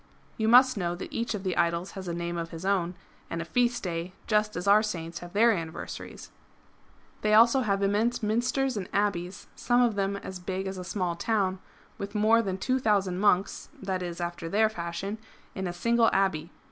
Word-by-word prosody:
You 220 - -1
must 255 +1 +6
know 175 -2 -1
that 175 - -8
each 230 -1 -1
of 195 - -6
the 185 -2 -1
idols 170 +2 0
has 190 -2 -8
a 170 - -2
name 170 0 -3
of 165 -1 -4
his 165 +2 -8
own, 185 -3 +1 0.3
and 165 - -3
a 165 - -3
feast 240 +4 +1
day, 175 0 -3
just 210 -1 +1
as 180 +3 -4
our 205 +2 +7
Saints 170 -5 -4
have 175 0 -10
their 230 +3 +5
anniversaries.^^ 165 -5 -6 0.9
They 215 - 0
have 215 +1 +8
also 235 +3 +4
immense 210 +2 +1
Minsters 245 +4 0
and 185 -3 -4
Abbeys, 190 -3 -1
some 245 0 +2
of 235 -2 +2
them 200 0 -1
as 190 -1 -7
big 190 +1 -4
as 190 -1 -4
a - - -5
small 180 -2 -2
town, 190 -1 0 0.4
with 200 +1 -6
more 220 +2 +4
than 190 -4 -3
two 255 +7 0
thousand 195 -6 +1
monks 195 -1 +1 0.2
{i.e. 180 -2 -2
after 170 -1 -4
their 215 +4 +3
fashion) 185 +2 -5 0.3
in 190 -1 -3
a - - -2
single 230 +6 +3
abbey. 190 -5 +1
195 Hz, 195 wpm, -28 LUFS, 175-220 Hz, 0.9 s, have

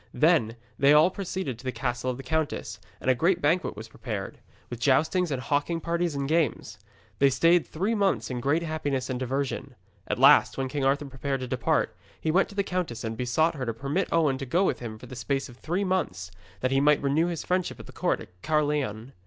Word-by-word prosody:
Then 150 -9 +3 0.2
they 140 +1 +6
all 155 +4 +6
proceeded 185 - -4
to - - -13
the 130 - -2
castle 125 0 -2
of 125 - -3
the 135 - -8
countess, 145 -7 -2 0.2
and - - -8
a 130 - +6
great 170 +8 +2
banquet 165 +3 +1
was 110 +1 -7
prepared, 110 -4 -6 0.3
with 120 - -7
joustings 160 +8 +2
and 135 -3 -2
hawking 145 +6 0
parties 170 -1 -1
and 140 -1 -2
games. 160 -3 0 0.4
They 140 - +6
stayed 165 +6 +3
three 195 +8 -1
months 190 - +1
in 125 - -3
great 145 +7 +1
happiness 145 -5 -2
and 125 - -2
diversion. 135 +2 -3 0.3
At - - -1
last, - - +6
when 135 -1 -2
King 140 0 -2
Arthur 140 +2 +2
prepared 135 0 -3
to 130 - -4
depart, 125 0 0 0.2
he 160 - 0
went 185 +4 +3
to 200 - -12
the 200 - +1
countess 180 -12 -3
and 110 0 -3
besought 125 +8 +1
her 135 -5 -4
to 115 - -2
permit 140 +10 -1
Owen 150 -5 +2
to 135 - -4
go 175 +9 +2
with - - 0
him 110 -3 -6
for 115 - -12
the 125 - -9
space 135 +3 -2
of 120 - -14
three 175 +8 -2
months, 95 - -2 0.3
that 130 - 0
he 135 0 +3
might 150 0 +4
renew 150 +5 +2
his 170 -3 -3
friendships 180 0 -1
at - - -13
the - - -12
court - - 0
at 90 0 -15
Caerleon. 145 -6 -1
140 Hz, 225 wpm, -27 LUFS, 125-165 Hz, 0.4 s, they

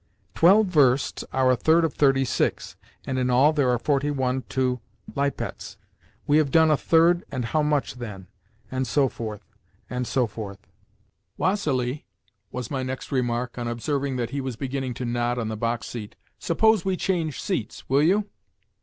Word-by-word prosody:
"Twelve 200 +6 +6
versts 140 -7 +2
are 130 -1 +3
a - - +4
third 160 +6 +3
of 155 - -2
thirty 135 -2 +3
six, - - -1 0.3
and 130 -1 -2
in 125 0 0
all 135 +5 +5
there 140 -4 +2
are 125 - +3
forty 140 +3 0
one 130 -2 0
to 130 -1 0 0.4
Lipetz. 140 0 -3 0.5
We 145 - +4
have 155 -3 +3
done 160 +2 +5
a - - +5
third 170 +3 +3
and 130 -4 -3
how 150 +7 +1
much, 150 -2 0
then?", 105 -7 -8 0.5
and 130 0 -1
so 135 +5 +3
forth, 110 -4 -7 0.5
and 125 -1 -2
so 130 -2 +1
forth. 105 -3 -7 0.8
"Vassili," 145 -9 -1 0.4
was 125 -3 -5
my 135 -2 -1
next 130 +2 -5
remark, 125 -2 -1
on 120 - -3
observing 135 +3 -2
that 120 -2 -2
he 140 - -2
was 130 -2 -4
beginning 130 -1 -3
to 125 - -4
nod 120 0 -1
on 115 -2 -2
the 110 - -3
box 115 +1 -2
seat, 115 -2 -7 0.2
"suppose 220 +3 +3
we 190 -1 0
change 165 -7 -1
seats? - - -4
Will 135 +2 +3
you?" 200 +7 +3
130 Hz, 175 wpm, -25 LUFS, 120-150 Hz, 0.8 s, Twelve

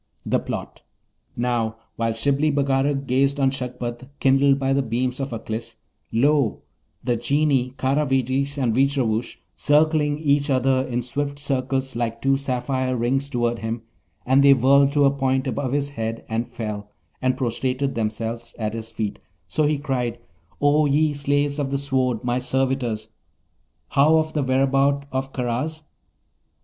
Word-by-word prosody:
THE - - +1
PLOT - - -6 0.5
Now, 120 -2 0 0.2
while 115 -1 0
Shibli 140 +6 +1
Bagarag 140 0 +1
gazed 135 +2 +2
on 135 -1 +3
Shagpat 125 -1 -5
kindled 135 +1 +4
by 135 0 +1
the 140 - +2
beams 125 +1 -1
of 135 0 -2
Aklis, 115 0 -5 0.4
lo, 140 0 +2 0.4
the 120 -2 +1
Genii 130 +1 +1
Karavejis 135 0 +1
and 125 -5 +1
Veejravoosh 125 -3 +1 0.2
circling 150 0 +2
each 145 -1 +1
other 130 0 +2
in 120 0 -1
swift 140 +3 -3
circles 135 -2 -1
like 115 -1 -2
two 135 +2 +2
sapphire 130 -1 -1
rings 135 +4 0
toward 120 -3 0
him, 115 +1 -4 0.4
and 135 +2 +4
they 140 -1 +8
whirled 140 +2 +5
to 145 -1 +4
a 140 - +5
point 130 -1 0
above 135 0 -2
his 140 0 0
head, 115 -3 -4
and 115 +2 -2
fell 105 -4 -5 0.3
and 130 0 +1
prostrated 130 +2 -1
themselves 115 +1 -3
at 110 -2 -2
his 115 -1 -5
feet: 110 -2 -4 0.3
so 150 - +1
he 150 0 +1
cried, 125 -5 -2 0.4
'O 145 +1 +4
ye 150 +2 +2
slaves 145 0 0
of 140 -2 -1
the 140 - 0
Sword, 130 -4 0
my 120 0 0
servitors! 125 -4 -1 0.8
how 150 +4 +4
of 155 0 0
the 150 - 0
whereabout 135 +1 +2
of 135 +1 -2
Karaz?' 130 +6 -2
135 Hz, 150 wpm, -23 LUFS, 120-140 Hz, 0.8 s, they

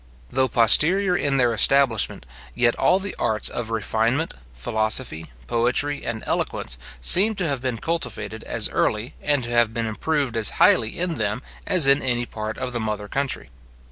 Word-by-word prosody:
Though 130 0 +1
posterior 175 - +5
in 140 -5 -1
their 120 -3 +2
establishment, 120 0 +2 0.3
yet 120 -1 +2
all 185 - +2
the 195 0 -5
arts 110 -2 0
of 120 -2 -5
refinement, 115 +7 -1 0.2
philosophy, 110 - -2 0.2
poetry, 125 +5 -1
and 110 -1 -5
eloquence, - - -3 0.2
seem 200 - +7
to 180 -4 -2
have 140 -4 -2
been 125 -3 -3
cultivated 110 -8 -5
as - - 0
early, 110 +3 -2
and 145 -3 0
to 120 - -5
have 120 -2 +1
been 115 -1 -2
improved 135 +3 -2
as 110 -3 +2
highly 110 - +3
in 175 -2 -3
them 110 +4 -2 0.2
as 180 -7 +4
in 140 +1 +4
any 120 -2 -1
part 110 -1 -7
of 125 - -5
the 120 - -2
mother 105 -2 -4
country. 135 - -4
120 Hz, 170 wpm, -22 LUFS, 110-145 Hz, 0.3 s, seem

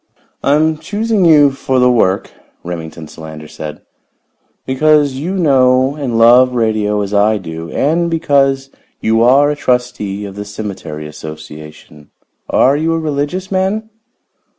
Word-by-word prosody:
"I 140 - +2
am 155 0 +1
choosing 210 -1 0
you 150 -4 +6
for 135 -1 -2
the 125 0 +4
work," 100 -5 +1 0.3
Remington 80 -2 -7
Solander 80 -1 -10
said, 75 0 -8 0.8
"because 145 +1 +2
you 160 +9 -4
know 130 -5 +3
and 130 -6 -3
love 125 +2 +6
radio 110 -3 0
as 100 +1 -5
I 105 +1 +3
do, 80 -3 -7
and 170 - 0
because 140 -4 +1 0.3
you 110 +1 +1
are 135 +5 +4
a - - -2
trustee 125 -7 -2
of 100 - -8
the 105 - -5
cemetery 100 -7 -7
association. 75 -1 -11 0.4
Are 135 +2 +3
you 160 +2 0
a - - -1
religious 155 +5 -3
man?" 200 +4 -1
125 Hz, 140 wpm, -15 LUFS, 100-150 Hz, 0.8 s, you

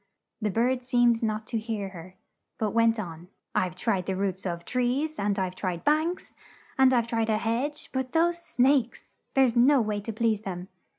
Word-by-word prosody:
The 215 - 0
bird 245 +5 +1
seemed 240 -2 +3
not 215 -1 -1
to 225 0 -2
hear 215 -3 -4
her, 185 0 -11 0.4
but 215 -2 -1
went 230 0 +3
on, 170 -3 -7 0.3
"I've 180 -1 0
tried 190 -2 -1
the 190 - -1
roots 190 0 -2
of 170 -1 -4
trees, 260 +5 -1
and 200 0 0
I've 185 -2 -1
tried 180 -2 -4
banks, 315 +4 0 0.4
and 265 -1 +5
I've 240 -3 +3
tried 230 -1 -1
a 215 - +2
hedge; 235 +7 -2
but 260 -1 -2
those 340 +2 +2
snakes! 260 -5 +1 0.2
There's 260 -3 +4
no 265 +4 +5
way 210 -3 -1
to 225 - -5
please 220 -1 0
them. 185 -2 -6
225 Hz, 185 wpm, -27 LUFS, 195-255 Hz, 0.4 s, and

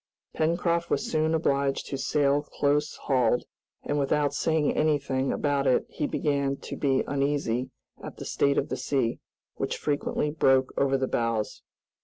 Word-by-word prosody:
Pencroft 170 +1 0
was 140 - 0
soon 155 +1 +1
obliged 140 -3 0
to - - -4
sail 145 0 +2
close 145 0 0
hauled, 125 -3 +2 0.4
and 145 0 -1
without 145 0 +1
saying 155 0 +1
anything 140 -3 +1
about 140 -2 0
it 130 - +3
he 145 - -2
began 140 -2 0
to - - -7
be 135 -2 +1
uneasy 140 -3 -1 0.3
at - - -8
the - - -7
state 140 0 +1
of - - 0
the - - -2
sea, 125 -5 -1 0.4
which - - -2
frequently 150 0 -1
broke 135 -4 +3
over 135 0 +2
the 130 0 -1
bows. 115 -3 -1
140 Hz, 155 wpm, -27 LUFS, 135-150 Hz, 0.4 s, it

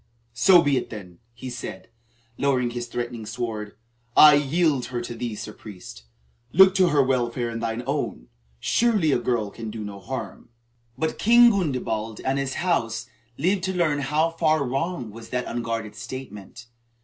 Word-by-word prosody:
"So 175 +9 +6
be 145 -2 +2
it 125 - -3
then," 90 -6 -10 0.2
he 125 +1 -7
said, 105 -6 -7 0.5
lowering 130 -2 +1
his 120 0 -5
threatening 120 -1 -4
sword. 105 -2 -5 0.4
"I 150 -1 +10
yield 145 -1 +2
her 125 -1 -4
to 120 0 -5
thee, 115 -1 -4
Sir 105 +1 -7
Priest. 90 - -11 0.5
Look 190 +2 +7
to 190 -2 +4
her 145 -4 +3
welfare 120 -2 0
and 115 0 -5
thine 115 +1 -3
own. 135 - -3 0.3
Surely 210 - +2
a 125 - +2
girl 115 -4 -1
can 115 0 -7
do 110 0 -6
no 100 -1 -7
harm." 90 - -7 0.5
But 160 0 -2
King 235 +2 +7
Gundebald 125 - -2
and 135 +1 +1
his 135 -1 -2
house 115 -10 -1 0.3
lived 185 +5 +1
to 190 -1 -2
learn 155 -5 +1
how 150 +4 +1
far 155 -2 +1
wrong 135 -2 -3
was 115 +1 -11
that 125 0 -2
unguarded 115 -2 -3
statement. 120 -3 -9
125 Hz, 165 wpm, -24 LUFS, 115-155 Hz, 0.5 s, I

